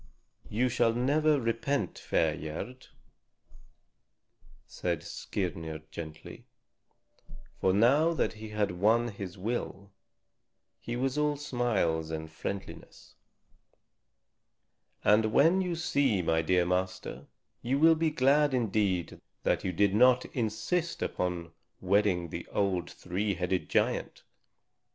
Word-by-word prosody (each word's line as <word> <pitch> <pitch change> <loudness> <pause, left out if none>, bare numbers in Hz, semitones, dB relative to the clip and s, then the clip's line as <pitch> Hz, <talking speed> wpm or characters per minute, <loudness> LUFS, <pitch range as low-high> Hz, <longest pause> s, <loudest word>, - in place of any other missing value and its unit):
"You 120 +4 +1
shall 120 -2 +2
never 145 +5 +2
repent, 115 - -1
fair 80 -2 +1
Gerd," 95 +12 -7 1.8
said - - -3
Skirnir 80 -5 -4
gently. 80 -1 -9 1.1
For 95 - +3
now 135 - +4
that - - 0
he 110 0 -9
had 105 -2 0
won 110 +7 +2
his 100 -3 -7
will, 100 -1 -4 0.9
he 120 - -5
was 135 +3 -1
all 150 -1 +1
smiles 110 - 0
and 80 0 -5
friendliness. 95 +4 -7 1.9
"And 110 +1 +4
when 165 - +4
you 180 -2 -1
see 140 - +1
my 80 0 +2
dear 90 +2 +2
master, 90 +1 -3 0.3
you 130 +3 0
will 165 +3 +6
be 160 0 +1
glad 145 0 +3
indeed 100 -7 0 0.2
that - - +1
you 95 - -1
did 100 +2 +2
not 125 +3 +5
insist 130 +9 -1
upon 85 -2 -3 0.3
wedding 95 -3 +1
the - - -6
old 95 -4 -1
three 100 +3 -2
headed 90 +1 -2
giant. - - 0
105 Hz, 115 wpm, -30 LUFS, 90-130 Hz, 1.9 s, will